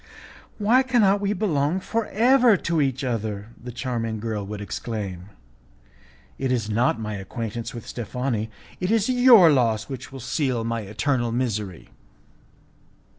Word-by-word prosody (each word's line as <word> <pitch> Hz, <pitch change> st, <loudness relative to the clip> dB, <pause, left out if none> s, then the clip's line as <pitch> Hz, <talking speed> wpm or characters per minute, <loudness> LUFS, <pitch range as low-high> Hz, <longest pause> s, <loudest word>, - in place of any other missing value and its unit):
"Ah! -, -, -19 dB
why 225 Hz, +5 st, +4 dB
can 255 Hz, -3 st, +2 dB, 0.2 s
we 200 Hz, 0 st, -1 dB
not 205 Hz, -, -1 dB
belong 165 Hz, -3 st, +1 dB
for 225 Hz, +3 st, -2 dB
ever 240 Hz, 0 st, +4 dB
to 170 Hz, -2 st, 0 dB
each 135 Hz, -1 st, -1 dB
other?" 110 Hz, -4 st, -3 dB
the 125 Hz, +1 st, -9 dB
charming 115 Hz, -3 st, -3 dB
girl 110 Hz, -2 st, -3 dB
would 105 Hz, +1 st, -6 dB
exclaim. 100 Hz, -3 st, -5 dB, 1.1 s
"It 135 Hz, -1 st, -1 dB
is 115 Hz, -4 st, -1 dB
not 115 Hz, +1 st, +2 dB
my 105 Hz, -1 st, -4 dB
acquaintance 115 Hz, +3 st, -5 dB
with 115 Hz, -, -8 dB
Steffani, 120 Hz, -1 st, -3 dB, 0.3 s
it 185 Hz, -, -1 dB
is 225 Hz, +1 st, +2 dB
your 245 Hz, -9 st, +7 dB
loss 115 Hz, -5 st, +1 dB
which 135 Hz, -1 st, -7 dB
will 135 Hz, -, -8 dB
seal 130 Hz, -1 st, -1 dB
my 115 Hz, 0 st, -2 dB
eternal 120 Hz, +4 st, -1 dB
misery." 110 Hz, -7 st, -3 dB
125 Hz, 150 wpm, -24 LUFS, 110-170 Hz, 1.1 s, your